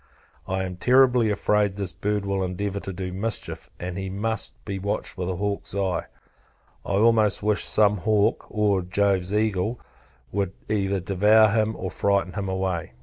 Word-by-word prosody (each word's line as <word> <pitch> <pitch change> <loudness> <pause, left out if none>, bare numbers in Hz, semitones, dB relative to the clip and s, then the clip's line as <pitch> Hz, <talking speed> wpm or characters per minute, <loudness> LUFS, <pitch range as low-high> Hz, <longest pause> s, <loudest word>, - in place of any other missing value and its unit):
I 95 0 -1
am 90 -1 -5
terribly 125 0 +4
afraid, 105 -1 +1
this 100 -4 -3
bird 100 +2 -2
will 100 -1 -1
endeavour 95 +2 -2
to 95 - -6
do 90 0 -5
mischief. 105 +3 -3
He 90 +2 -4
must 110 +3 -3
be 100 -2 -4
watched 100 +2 -3
with 90 -1 -3
a 95 - -2
hawk's 100 +1 -3
eye. 95 -3 -1 0.8
I - - -3
almost 110 -1 +3
wish 105 -1 +2
some 105 -1 +4
hawk, 105 +1 +1
or 105 -3 +1
Jove's 95 0 +1
eagle, 105 +1 0 0.5
would 100 -1 -1
either 100 -2 0
devour 105 +4 +4
him 110 +1 +1
or 95 - -5
frighten 100 -2 0
him 100 -2 -3
away. 95 -2 -2
100 Hz, 160 wpm, -24 LUFS, 95-105 Hz, 0.8 s, terribly